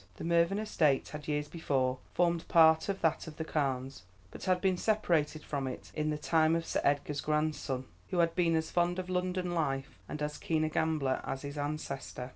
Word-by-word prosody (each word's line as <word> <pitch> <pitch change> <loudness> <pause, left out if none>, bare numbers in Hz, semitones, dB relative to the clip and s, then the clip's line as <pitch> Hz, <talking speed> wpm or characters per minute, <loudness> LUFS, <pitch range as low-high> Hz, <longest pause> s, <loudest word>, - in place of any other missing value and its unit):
The - - -8
Mervyn 170 +3 +3
estate 155 -10 +1
had 150 -1 -8
years 150 -1 -1
before 135 -6 0 0.2
formed 170 -1 +1
part 160 +1 +5
of 195 - -2
that 160 +1 +1
of 155 - -9
the 160 - -3
Carnes, 135 - -2 0.3
but - - -8
had 185 -1 +3
been 190 0 +2
separated 170 -7 +1
from 140 -2 -3
it 130 - -7
in 155 0 -1
the 150 - -1
time 160 +1 +3
of 165 0 -1
Sir - - -1
Edgar's 145 0 +1
grandson, 150 -4 -1 0.2
who 180 - -2
had 170 -1 +3
been 170 -3 +2
as 160 0 -1
fond 175 0 +1
of 185 0 -4
London 180 0 -1
life 135 -4 -2
and 150 - -4
as 150 0 -3
keen 160 -1 0
a 155 - +1
gambler 155 -4 0
as 135 - -4
his 140 0 -6
ancestor. 145 -3 -4
155 Hz, 205 wpm, -32 LUFS, 145-170 Hz, 0.3 s, part